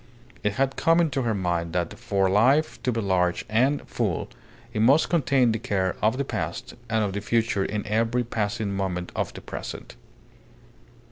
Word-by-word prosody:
It 105 - 0
had 135 +3 0
come 165 +1 +4
into 150 -5 +1
her 115 -3 0
mind 85 -3 -1
that 90 -1 -1
for 100 -5 +1
life 125 +11 +3
to 125 - 0
be 115 - -1
large 90 -3 +1
and 130 +7 +1
full, - - -2 0.4
it 105 - 0
must 135 +8 +5
contain 135 -7 +3
the 110 - -1
care 95 -5 -1
of 110 +4 +2
the 140 - -1
past - - -4 0.2
and 110 -1 +2
of 100 -2 -2
the 100 - -3
future 110 -2 +1
in 105 +1 -3
every 115 +3 +1
passing 110 -2 -2
moment 90 -2 -3
of - - -1
the - - -9
present. - - -7
110 Hz, 180 wpm, -25 LUFS, 100-125 Hz, 0.4 s, must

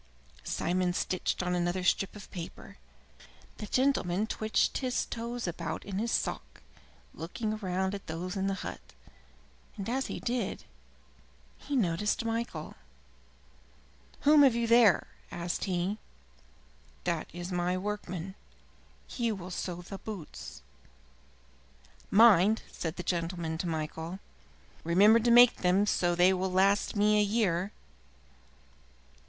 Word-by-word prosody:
Simon 180 - 0
stitched 185 0 -1
on 180 0 -1
another 175 +1 0
strip 190 +3 +1
of 205 - -11
paper. 170 -3 -8 0.8
The 210 - -6
gentleman 215 -7 +1
twitched 220 0 0
his 255 -2 -1
toes 235 +1 -5
about 170 - -4
in 195 -1 -3
his 230 +2 -1
sock, - - -3 0.5
looking 215 +7 -4
round 190 -1 -1
at 200 - -7
those 175 +4 -4
in 195 0 -1
the 195 - 0
hut, - - -6 1.0
and 195 - -5
as 265 +3 -1
he - - -5
did 235 -5 -2
so - - -23 0.9
he 290 - -4
noticed 210 +1 0
Michael. 230 +1 -3 1.5
"Whom 295 +1 +6
have 265 -4 +6
you 235 0 +1
there?" 230 -4 +5 0.2
asked 170 0 -3
he. 190 +2 -1 1.0
"That 170 -3 -1
is 175 +2 -6
my 180 +1 0
workman. 190 -2 -4 0.7
He 235 -2 -2
will 185 -3 -6
sew 180 0 -4
the 195 +2 -8
boots." 200 -8 -8 1.5
"Mind," 215 -1 +6
said 165 -1 -4
the 180 - -5
gentleman 170 -2 -2
to 180 - -2
Michael, 160 +2 -4 0.7
"remember 200 +7 +6
to 235 +1 +1
make 240 0 +7
them 185 +3 +3
so 175 -4 +1
that - - -4
they 180 +2 +5
will 190 0 -1
last 195 +3 +2
me 210 +1 +4
a - - +4
year." 200 -3 0
190 Hz, 130 wpm, -30 LUFS, 175-220 Hz, 1.5 s, make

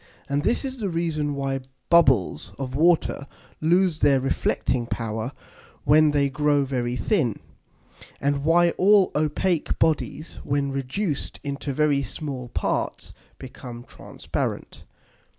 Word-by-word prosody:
And 140 +1 0
this 240 - 0
is 265 -1 -5
the 205 -3 -1
reason 160 -4 -1
why 135 -1 -2 0.3
Bubbles 120 - +3
of 130 -2 -5
Water 155 -2 +2 0.3
lose 175 +1 +2
their 140 -2 +4
reflecting 130 -2 -1
power 110 +1 -3 0.5
when 155 +2 +5
they 145 -1 +2
grow 145 0 +1
very 125 -2 -2
thin; 130 - 0 0.8
and 140 0 0
why 170 +2 +4
all 200 0 +5
opake 155 +3 0
Bodies, 160 0 -1
when 140 -1 -1
reduced 140 +5 -3
into 140 0 -4
very 145 0 +2
small 135 -4 -5
parts, - - -2 0.2
become 125 -2 -9
transparent. - - -5
145 Hz, 120 wpm, -24 LUFS, 130-160 Hz, 0.8 s, when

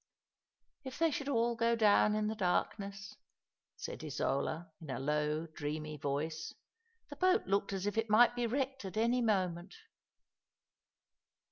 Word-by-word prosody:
'* - - -60 0.3
If 260 -2 -7
they 330 -1 +3
should 285 -1 -3
all 235 -2 +2
go 230 0 +2
down 210 -1 +4
in 215 0 0
the 215 - 0
darkness! 200 +1 -2 0.3
" - - -60
said - - -7
Isola, 155 +3 -2
in 155 - -10
a 130 - -2
low, 150 +3 0
dreamy 155 -1 -5
voice. 145 +3 -3 0.3
" 460 0 -43
The - - -6
boat 370 +3 +3
looked 200 +1 0
as 195 -1 -3
if 205 +2 0
it 225 0 -2
might 240 +3 +6
be 240 -1 0
wrecked 270 +1 -2
at 190 +2 -6
any 235 +3 +2
moment." 185 -5 0
205 Hz, 160 wpm, -34 LUFS, 160-235 Hz, 0.3 s, might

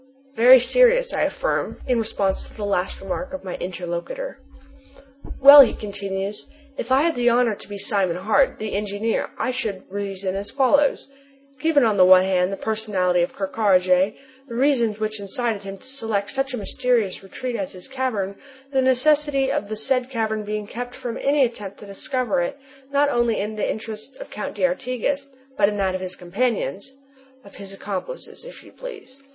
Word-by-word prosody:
"Very 255 +1 +8
serious," - - +4
I - - +1
affirm, - - -2
in 250 -2 +2
response 200 -3 -1
to - - -17
the 210 - -4
last 195 -2 -1
remark 265 +9 -4
of 280 - -6
my 185 -2 -5
interlocutor. 180 - -5 1.0
"Well," 280 +1 +11
he 260 - +4
continues, 200 -1 -5 0.3
"if 245 - -5
I 270 +2 +5
had 335 0 +2
the 245 -3 +2
honor 240 -1 +3
to 200 - -9
be 205 - -6
Simon 195 -4 0
Hart, 215 +8 +2
the 215 -1 -5
engineer, 205 +2 -1
I 255 - -1
should 220 -7 -4
reason 195 -1 -4
as 200 +1 -4
follows: 280 +1 +2 0.5
'Given, 315 -3 +3
on 215 -3 +2
the 185 - +7
one 185 0 +8
hand, 185 -1 +1
the 195 - -4
personality 195 -5 0
of 175 - -1
Ker 195 - -2
Karraje, 190 -1 +3 0.3
the 235 - -7
reasons 240 -5 +2
which 215 0 -2
incited 215 +1 -2
him 195 0 -8
to - - -16
select 225 -7 -3
such 270 -1 -2
a - - -5
mysterious 230 -2 0
retreat 240 +6 -5
as 195 -4 -4
this 180 -1 -11
cavern, 250 -8 -2 0.3
the 265 -1 +2
necessity 275 +1 +2
of 205 - -2
the 215 - -3
said 255 +3 0
cavern 220 -4 -1
being 210 0 -4
kept 245 +3 -7
from 245 -3 -5
any 280 -1 +3
attempt 210 -5 -7
to - - -11
discover 210 +1 -2
it, 175 - -3 0.3
not 285 +1 +3
only 240 -4 +1
in 210 +2 -3
the 210 - -1
interest 220 +4 -6
of - - -10
the - - -13
Count 210 - -5
d'Artigas, 250 +9 -1 0.3
but 200 -1 +4
in 205 - -4
that 190 -2 0
of 185 - -3
his 185 0 -5
companions 205 +4 -2 0.3
'" 265 -2 -29
"Of 200 - -14
his 195 -1 -9
accomplices, 200 - -6
if - - -12
you - - -16
please." 420 - -10
220 Hz, 190 wpm, -23 LUFS, 195-260 Hz, 1.0 s, Well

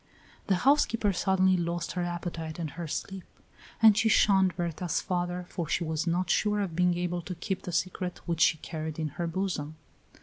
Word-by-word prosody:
The 195 - +3
housekeeper 230 -7 +3
suddenly 190 0 +3
lost 170 0 -2
her 180 - -2
appetite 175 -2 -4
and 160 -4 -4
her 170 +1 -6
sleep; 190 +4 -4 0.6
and 220 -2 +9
she 225 +1 +3
shunned 190 -4 +4
Berta's 170 -1 -1
father, 180 -1 -2
for 170 -3 -4
she - - +1
was 160 +1 -2
not 175 +2 +1
sure 210 0 +2
of 180 -5 -3
being 180 0 +2
able 175 0 -2
to 180 +2 -6
keep 185 +3 -3
the 180 - -6
secret 180 +1 -2
which 170 -2 -2
she 160 - +5
carried 155 -1 -5
in 155 -1 -2
her 170 +4 -4
bosom. 165 -4 -3
175 Hz, 190 wpm, -29 LUFS, 165-190 Hz, 0.6 s, and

